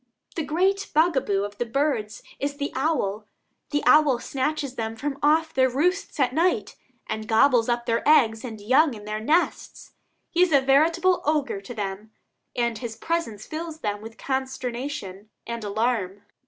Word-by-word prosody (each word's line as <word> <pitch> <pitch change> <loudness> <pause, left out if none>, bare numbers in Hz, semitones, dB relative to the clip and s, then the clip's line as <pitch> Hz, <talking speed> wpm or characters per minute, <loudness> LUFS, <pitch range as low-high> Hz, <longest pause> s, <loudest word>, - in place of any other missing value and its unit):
The 330 - -1
great 375 +7 0
bugaboo 270 - +2
of 205 0 -7
the 240 - 0
birds 230 -5 -1 0.2
is 280 0 -3
the 285 0 -3
owl. 225 -8 -1 0.4
The 290 -1 -1
owl 300 -4 +5
snatches 275 +2 -2
them 225 -3 -4
from 275 +4 -4
off 315 +2 +3
their 260 0 +3
roosts 345 +8 -1
at 255 -2 +2
night, 340 +5 +1 0.3
and 220 0 -5
gobbles 240 +1 +4
up 240 0 0
their 230 -1 +1
eggs 225 -7 +4
and 225 -4 -7
young 260 +6 +3
in 210 -1 -11
their 215 0 -3
nests. 310 +11 -1 0.4
He 350 - +2
is 365 -2 +4
a 280 - +6
veritable 325 +7 +3
ogre 290 -9 0
to 215 +5 -9
them, 205 0 -5 0.5
and 235 -2 -1
his 230 -2 -6
presence 275 -12 -3
fills 315 0 -6
them 205 -1 -2
with 225 +1 -10
consternation 250 -6 -4 0.2
and 235 -1 -5
alarm. 205 -2 -1
260 Hz, 165 wpm, -25 LUFS, 220-305 Hz, 0.5 s, a